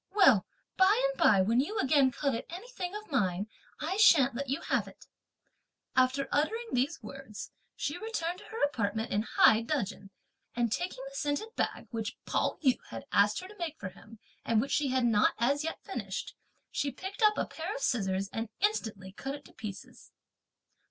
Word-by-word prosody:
Well, 270 Hz, -, +6 dB, 0.3 s
by 390 Hz, +4 st, +5 dB
and -, -, -10 dB
by, 200 Hz, -3 st, +6 dB
when 230 Hz, +5 st, +3 dB
you 360 Hz, +12 st, -1 dB
again 275 Hz, -5 st, +4 dB
covet 265 Hz, -2 st, -2 dB
anything 375 Hz, 0 st, -6 dB
of 425 Hz, -4 st, -8 dB
mine, 195 Hz, -7 st, +1 dB, 0.3 s
I 340 Hz, +6 st, -2 dB
shan't 310 Hz, -11 st, +6 dB
let 275 Hz, +2 st, -4 dB
you 275 Hz, +4 st, 0 dB
have -, -, 0 dB
it." -, -, -14 dB, 0.9 s
After 260 Hz, +2 st, +3 dB
uttering 450 Hz, +11 st, 0 dB
these 270 Hz, +6 st, 0 dB
words, 270 Hz, -7 st, -8 dB, 0.2 s
she 290 Hz, +4 st, -3 dB
returned 360 Hz, -5 st, -3 dB
into 420 Hz, -, -13 dB
her 450 Hz, -, -3 dB
apartment 220 Hz, -5 st, 0 dB
in 205 Hz, -, +2 dB
high 220 Hz, 0 st, +5 dB
dudgeon, 225 Hz, -7 st, -3 dB, 0.5 s
and 235 Hz, -2 st, +1 dB
taking 365 Hz, -, -2 dB
the -, -, -10 dB
scented 375 Hz, +6 st, -2 dB
bag, -, -, -2 dB
which 225 Hz, -2 st, -4 dB
Pao -, -, 0 dB
yü 260 Hz, -, +4 dB
had 115 Hz, -, -7 dB
asked 205 Hz, -, +3 dB
her 370 Hz, -, -8 dB
to 420 Hz, +2 st, -14 dB
make 325 Hz, -3 st, -3 dB
for 185 Hz, -, -4 dB
him, 215 Hz, +4 st, -15 dB, 0.3 s
and 225 Hz, -2 st, +2 dB
which 270 Hz, +5 st, -1 dB
she 295 Hz, -, +2 dB
had 260 Hz, -1 st, +2 dB
not 215 Hz, -3 st, +4 dB
as 275 Hz, +6 st, +2 dB
yet 325 Hz, -, -4 dB
finished, 200 Hz, -5 st, -5 dB, 0.4 s
she 280 Hz, -, 0 dB
picked 385 Hz, -, -7 dB
up 425 Hz, -1 st, +5 dB
a -, -, +1 dB
pair 345 Hz, +7 st, -5 dB
of -, -, -5 dB
scissors, 195 Hz, -, 0 dB
and 225 Hz, 0 st, -3 dB
instantly 220 Hz, -, -1 dB
cut 270 Hz, +7 st, -5 dB
it 285 Hz, -, -12 dB
to -, -, -16 dB
pieces. 205 Hz, -3 st, -9 dB
275 Hz, 185 wpm, -31 LUFS, 220-355 Hz, 0.9 s, Well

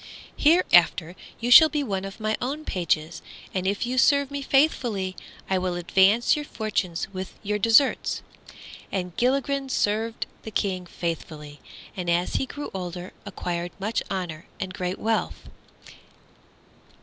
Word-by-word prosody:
Hereafter 175 Hz, -, +4 dB, 0.2 s
you 240 Hz, +1 st, -2 dB
shall 315 Hz, +5 st, +10 dB
be 300 Hz, -2 st, -1 dB
one 195 Hz, -6 st, -3 dB
of 195 Hz, +3 st, -8 dB
my 215 Hz, 0 st, 0 dB
own 285 Hz, +5 st, -3 dB
pages, 165 Hz, -2 st, -1 dB, 0.3 s
and 185 Hz, 0 st, -1 dB
if 200 Hz, +3 st, 0 dB
you 255 Hz, +1 st, 0 dB
serve 280 Hz, 0 st, +4 dB
me 285 Hz, 0 st, -3 dB
faithfully 240 Hz, -10 st, +1 dB, 0.3 s
I 190 Hz, -1 st, +1 dB
will 180 Hz, -1 st, -2 dB
advance 190 Hz, +6 st, +3 dB
your 300 Hz, -, -3 dB
fortunes 210 Hz, -, -2 dB
with 185 Hz, 0 st, -6 dB
your 210 Hz, 0 st, -1 dB
deserts." 230 Hz, +6 st, +3 dB, 0.7 s
And 180 Hz, -3 st, -3 dB
Gilligren 275 Hz, +2 st, 0 dB
did -, -, -7 dB
serve 220 Hz, +1 st, 0 dB, 0.3 s
the -, -, -7 dB
King 185 Hz, -4 st, -2 dB
faithfully, 155 Hz, -4 st, -5 dB, 0.4 s
and 180 Hz, -2 st, -3 dB
as 175 Hz, +1 st, +1 dB
he 265 Hz, -, -2 dB
grew 290 Hz, +2 st, -7 dB
older 180 Hz, -1 st, -6 dB
acquired 175 Hz, -2 st, -4 dB
much 215 Hz, +4 st, -1 dB
honor 175 Hz, -5 st, -4 dB
and 185 Hz, 0 st, -4 dB
great 180 Hz, -1 st, -3 dB
wealth. 225 Hz, 0 st, -2 dB
195 Hz, 145 wpm, -25 LUFS, 180-245 Hz, 0.7 s, shall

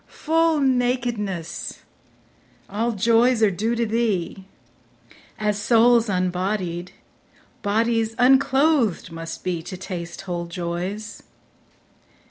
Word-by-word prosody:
Full 325 Hz, 0 st, +1 dB
nakedness! 245 Hz, -, -1 dB, 0.8 s
All 230 Hz, +4 st, -1 dB
joys 230 Hz, +3 st, +3 dB
are 210 Hz, -, +5 dB
due 220 Hz, +6 st, -1 dB
to 235 Hz, 0 st, 0 dB
thee; 210 Hz, -5 st, -1 dB, 0.9 s
As 210 Hz, -1 st, -1 dB
souls 235 Hz, 0 st, +4 dB
unbodied, 180 Hz, -1 st, -2 dB, 0.7 s
bodies 225 Hz, +1 st, 0 dB
unclothed 265 Hz, -, +3 dB
must 165 Hz, 0 st, -7 dB
be 175 Hz, -3 st, -2 dB
To 185 Hz, +3 st, -8 dB
taste 175 Hz, -2 st, -6 dB
whole 175 Hz, -2 st, -4 dB
joys. 180 Hz, +5 st, -5 dB
215 Hz, 95 wpm, -23 LUFS, 180-235 Hz, 0.9 s, are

